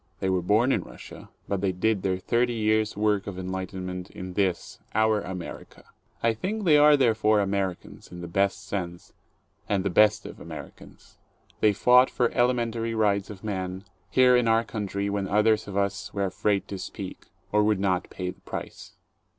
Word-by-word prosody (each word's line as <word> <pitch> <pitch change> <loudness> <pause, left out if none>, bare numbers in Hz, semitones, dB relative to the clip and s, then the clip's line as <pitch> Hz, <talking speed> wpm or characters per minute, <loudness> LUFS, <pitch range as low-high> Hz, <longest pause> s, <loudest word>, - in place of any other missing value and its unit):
They 95 - 0
were 90 -1 +1
born 110 +8 +3
in - - +1
Russia, - - -12 0.2
but 100 -2 -2
they 100 -2 +1
did 100 +2 0
their 95 -1 0
thirty 120 +5 0
years' 110 -1 +1
work 105 -2 +1
of 100 -2 -5
en 95 0 -5
lightenment 95 -1 -5
in 95 0 -8
this, 95 -3 -1 0.2
our 110 -1 +3
America. 90 -2 -8 0.4
I 115 0 +3
think 205 - -3
they 160 -5 +5
are 150 0 +7
therefore 110 -4 +3
Amer 100 -2 0
icans, - - -16
in 90 0 -8
the 85 - -6
best 100 +2 0
sense, 85 -3 -5 0.6
and 100 -2 +1
the 100 - 0
best 105 +2 +4
of - - -9
Americans. - - -11 0.4
They 105 - +4
fought 125 +5 +5
for 120 -2 +1
the - - -15
elementary 115 -2 +1
rights 100 -3 +1
of 105 -2 -10
men, 95 -2 -4 0.3
here 125 -1 +5
in 125 -1 +3
our 115 0 +3
country 100 -2 -3
when 100 -1 -2
others 105 +2 +2
of 100 -1 -5
us 100 -1 -1
were 100 -1 0
afraid 100 +1 0
to 100 - -5
speak, 95 0 -8 0.2
or 105 - +3
would 105 -2 +2
not 95 -2 0
pay 90 -1 -4
the - - -19
price. - - -8
100 Hz, 190 wpm, -26 LUFS, 95-110 Hz, 0.6 s, are